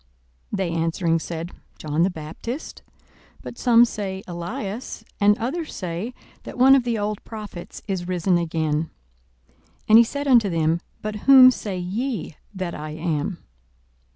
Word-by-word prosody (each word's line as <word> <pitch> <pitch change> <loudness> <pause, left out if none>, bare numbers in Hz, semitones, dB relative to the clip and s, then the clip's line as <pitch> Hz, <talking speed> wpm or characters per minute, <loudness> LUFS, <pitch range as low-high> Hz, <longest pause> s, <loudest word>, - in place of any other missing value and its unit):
42:009:019 - - -2
They 190 -3 -1
answering 165 0 0
said, 165 +1 -5 0.3
John 155 +1 -2
the 180 - +4
Baptist; 180 - -7 0.6
but - - -9
some 240 -1 +6
say, 195 -4 -5
Elias; 200 +6 -5 0.2
and 205 +1 +4
others 305 +8 -4
say, 185 +7 -4 0.3
that - - -9
one 260 +2 +7
of 265 -3 +4
the 235 -2 0
old 210 0 -3
prophets 210 -6 -9
is 185 -3 -3
risen 180 0 +1
again. 160 -1 -1 1.0
42:009:020 215 - +8
He - - +8
said 285 +5 -4
unto 235 -6 +5
them, 165 0 +1 0.2
But 215 0 -3
whom 260 -2 +10
say 205 -6 -4
ye 195 - -3 0.2
that 185 -2 -3
I 155 +1 -6
am? 160 +2 -3
190 Hz, 150 wpm, -23 LUFS, 170-230 Hz, 1.0 s, whom